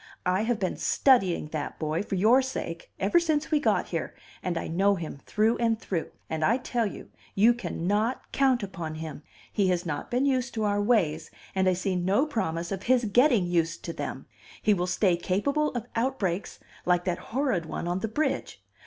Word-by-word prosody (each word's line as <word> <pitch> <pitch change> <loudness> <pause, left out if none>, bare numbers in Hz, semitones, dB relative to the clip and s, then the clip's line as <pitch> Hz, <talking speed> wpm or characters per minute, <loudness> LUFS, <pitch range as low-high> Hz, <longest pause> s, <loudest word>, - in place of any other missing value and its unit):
I 185 +2 +2
have 240 -1 +1
been 185 -2 -1
studying 195 - +3
that 155 -2 -4
boy 155 +1 -1
for 200 -1 -3
your 225 +8 +5
sake 170 -10 -5
ever 200 - +4
since 315 -2 0
we 305 - +4
got 290 - +1
here, - - -3 0.3
and 175 -2 -2
I - - -3
know 195 +4 +2
him 160 -5 -6
through 220 +2 +2
and 230 -2 +1
through. 175 -7 -3 0.2
And 160 -1 -2
I 230 +9 +4
tell 240 -3 -1
you, - - -9 0.3
you 225 +5 +6
cannot 215 +1 -2
count 260 -4 +2
upon 170 -5 -5
him. 155 -2 -6 0.3
He 200 -2 +2
has 180 -1 0
not 150 -4 -4
been 250 +3 +1
used 255 -3 0
to 220 - -1
our 205 -1 +1
ways, 170 -9 +1 0.2
and 190 -1 +3
I - - +3
see 185 +1 -1
no 190 +9 +2
promise 170 - -2
of 190 -1 -3
his 250 -1 +3
getting 240 -1 +4
used 170 -1 0
to 170 - -4
them. - - -5 0.3
He 210 - +3
will 180 -2 0
stay 180 0 +2
capable 280 - 0
of 240 -2 -2
outbreaks 225 -7 -1 0.3
like 175 -1 +2
that 180 -1 -1
horrid 230 - 0
one 170 - -4
on 175 +1 0
the 225 - -2
bridge. 295 +9 -2
200 Hz, 195 wpm, -27 LUFS, 175-240 Hz, 0.3 s, you